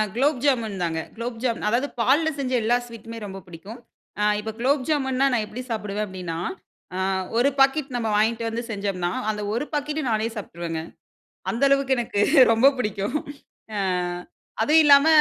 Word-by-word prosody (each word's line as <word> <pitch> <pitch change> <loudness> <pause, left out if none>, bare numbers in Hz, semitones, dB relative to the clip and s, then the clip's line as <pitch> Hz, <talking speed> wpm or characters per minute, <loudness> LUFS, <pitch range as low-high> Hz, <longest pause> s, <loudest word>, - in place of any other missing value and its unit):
குலோப் 270 +1 +1
ஜாமுன் 230 -8 +1
தாங்க. 165 -1 -1 0.2
குலோப் 230 0 -5
ஜாமூன் 235 -4 -1
அதாவது 245 +6 +1
பால்ல 290 +7 +3
செஞ்ச 260 -2 -2
எல்லா 240 +2 +3
ஸ்வீட்டுமே 230 -1 -9
ரொம்ப 195 -1 -7
பிடிக்கும். 185 +8 -10 0.4
ஆ - - +2 0.2
இப்போ 220 +1 -4
குலோப் 270 +3 +2
ஜாமுன்னா 270 -3 +1
நான் 235 -3 +1
எப்டி 225 +4 -7
சாப்புடுவேன் 210 -2 -2
அப்டின்னா, 180 -3 -5 0.6
ஆ. - - -2 0.4
"ஒரு 250 +4 +4
பாக்கெட் 270 -1 +3
நம்ம 230 -2 -1
வாங்கிட்டு 225 +2 +1
வந்து 230 +1 -3
செஞ்சோம்னா" 195 -4 -2 0.2
அந்த 210 -1 -2
ஒரு 240 +6 -1
பாக்கெட் 295 +1 -1
நானே 220 0 +1
சாப்ட்டுருவேங்க. 170 -5 -5 0.7
அந்த 235 +4 -2
அளவுக்கு 275 -1 +3
எனக்கு 225 -4 -1 0.3
ரொம்ப 230 +4 +5
புடிக்கும் 210 +3 -1 0.6
ஆ. - - 0 0.8
அதுவும் 305 +8 +5
இல்லாம 285 0 +7
230 Hz, 160 wpm, -24 LUFS, 210-270 Hz, 0.8 s, இல்லாம